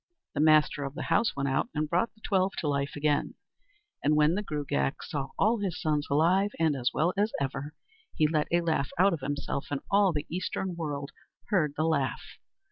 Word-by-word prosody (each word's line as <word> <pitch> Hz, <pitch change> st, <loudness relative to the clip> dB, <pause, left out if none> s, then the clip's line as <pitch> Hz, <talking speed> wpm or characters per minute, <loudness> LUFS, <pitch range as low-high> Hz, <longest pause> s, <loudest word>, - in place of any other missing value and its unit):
The -, -, -3 dB
master 155 Hz, -2 st, +4 dB
of 140 Hz, +1 st, -5 dB
the -, -, -4 dB
house 225 Hz, +7 st, +2 dB
went 140 Hz, 0 st, -1 dB
out 135 Hz, -, 0 dB
and 150 Hz, +1 st, 0 dB
brought 175 Hz, +8 st, +1 dB
the 215 Hz, -, -25 dB
twelve 190 Hz, -2 st, +1 dB
to 155 Hz, -, -3 dB
life 140 Hz, -1 st, -1 dB
again; 145 Hz, 0 st, 0 dB, 0.7 s
and 150 Hz, +1 st, +3 dB
when 150 Hz, +1 st, +4 dB
the 205 Hz, -, 0 dB
Gruagach 145 Hz, -, -2 dB
saw 140 Hz, -2 st, -3 dB
all 220 Hz, +3 st, +3 dB
his 190 Hz, -4 st, -2 dB
sons 150 Hz, -3 st, 0 dB
alive 175 Hz, +8 st, +3 dB
and 160 Hz, -3 st, +2 dB
as 125 Hz, -2 st, 0 dB
well 165 Hz, +6 st, +1 dB
as 205 Hz, +2 st, +1 dB
ever, 140 Hz, +2 st, -4 dB, 0.4 s
he 155 Hz, -, +3 dB
let 150 Hz, -1 st, 0 dB
a 175 Hz, 0 st, +2 dB
laugh 160 Hz, -5 st, 0 dB
out 190 Hz, +2 st, +5 dB
of 165 Hz, -, -2 dB
himself, 145 Hz, 0 st, -3 dB
and 145 Hz, -1 st, -2 dB
all 200 Hz, -1 st, +5 dB
the 150 Hz, -2 st, -3 dB
Eastern 185 Hz, +1 st, -3 dB
world 145 Hz, -4 st, -4 dB, 0.4 s
heard 155 Hz, -8 st, +2 dB
the 155 Hz, -, +1 dB
laugh. 145 Hz, -5 st, 0 dB
155 Hz, 205 wpm, -29 LUFS, 145-180 Hz, 0.7 s, out